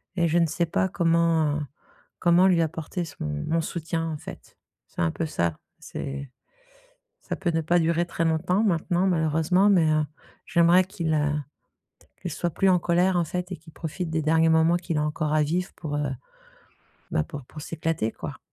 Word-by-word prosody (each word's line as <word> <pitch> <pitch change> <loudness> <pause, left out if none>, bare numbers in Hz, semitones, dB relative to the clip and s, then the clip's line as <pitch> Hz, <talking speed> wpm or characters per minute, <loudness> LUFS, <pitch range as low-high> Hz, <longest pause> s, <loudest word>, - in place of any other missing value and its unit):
et 170 -2 +2
je 165 +2 +2
ne 170 - +4
sais 170 +2 -1
pas 190 - +1
comment, 165 -4 +2
heu, - - -3 0.6
comment 175 +1 +5
lui 175 -3 +4
apporter 165 +2 -3
son 145 - -7
mon 75 - -1
soutien 165 0 -3
en 155 - -4
fait, - - -11 0.3
c'est - - -6
un 80 - +3
peu 165 - -3
ça 85 - -1 0.2
c'est 140 0 -6 0.9
ça - - -4
peut 190 -2 -1
ne 165 - +1
pas 175 +3 +3
durer 170 +1 +1
très 165 - -2
longtemps 180 +5 +1
maintenant 175 -1 +1
malheureusement, 165 +3 +3
mais 165 -5 +4
heu, 155 -1 +2 0.4
j'aimerais 170 +2 +5
qu'il, 175 -5 -2
heu 150 -1 +1 0.9
qu'il 175 -3 -4
soit 175 - -1
plus 195 +5 +2
en 180 -1 +4
colère 175 +2 +2
en 170 - +2
fait 180 +3 -4
et 180 - -4
qu'il 160 0 -17
profite 165 +1 -4
des 160 0 0
derniers 160 +1 +3
moments 160 +2 +4
qu'il 170 -2 -3
a 150 - +1
encore 150 0 -1
à 155 -1 +4
vivre 175 +5 -2
pour, 145 -3 -4
heu, 145 -2 -1 1.0
bah 75 - +1
pour 140 -3 -9
pour 155 - -10
s'éclater 160 -7 -2
quoi. - - -7
165 Hz, 190 wpm, -25 LUFS, 155-175 Hz, 1.0 s, comment